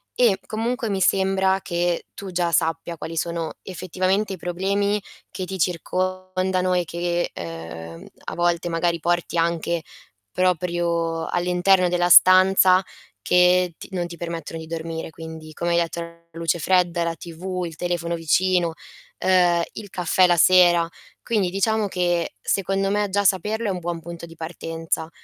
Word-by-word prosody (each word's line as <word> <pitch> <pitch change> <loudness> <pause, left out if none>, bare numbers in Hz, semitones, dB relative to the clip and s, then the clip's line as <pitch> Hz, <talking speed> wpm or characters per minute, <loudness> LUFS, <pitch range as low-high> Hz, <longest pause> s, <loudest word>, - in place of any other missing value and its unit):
e 230 -6 +4
comunque 230 +1 -2
mi 195 -1 -1
sembra 190 0 +2
che 175 -1 -1
tu 195 -2 -8
già 175 -1 0
sappia 165 +1 0
quali 165 +1 -6
sono 170 -1 -2
effettivamente 185 +3 -1
i 185 - -6
problemi 200 +4 -1 0.3
che 185 - -5
ti 190 +1 -5
circondano 185 +1 -1
e 175 -1 +1
che, 175 +1 -2
uhm, 80 0 -8 0.2
a - - -5
volte 175 0 0
magari 170 0 0
porti 175 +1 0
anche 170 0 0 0.5
proprio 170 -2 0
all'interno 180 +1 +2
della 175 0 +1
stanza 185 +1 +7 0.4
che 180 -1 +4
t - - -11
non 180 -2 -2
ti 170 0 -8
permettono 165 -1 -5
di 160 - -9
dormire. 165 0 -5
Quindi, 160 -1 -10
come 170 +2 -2
hai 170 - +3
detto, 170 0 -1
la 170 0 -10
luce 165 +1 -1
fredda, 175 -1 +2
è - - +2
la 165 0 -2
TV, 180 +2 -5
il 165 - -7
telefono 175 0 -2
vicino, 170 +1 +1 0.5
uhm, 175 -2 +4
il 205 - -8
caffè 180 0 +3
la 175 -1 +3
sera... 175 -1 +5 0.4
quindi 210 -6 0
diciamo 210 +3 +1
che 175 -2 -1
secondo 195 0 0
me, 205 0 0
già 205 +1 +1
saperlo 210 +4 +1
è 200 - +1
un 180 - -3
buon 175 0 -4
punto 170 +1 -8
di 165 - -13
partenza 165 0 -4
175 Hz, 155 wpm, -23 LUFS, 170-185 Hz, 0.5 s, stanza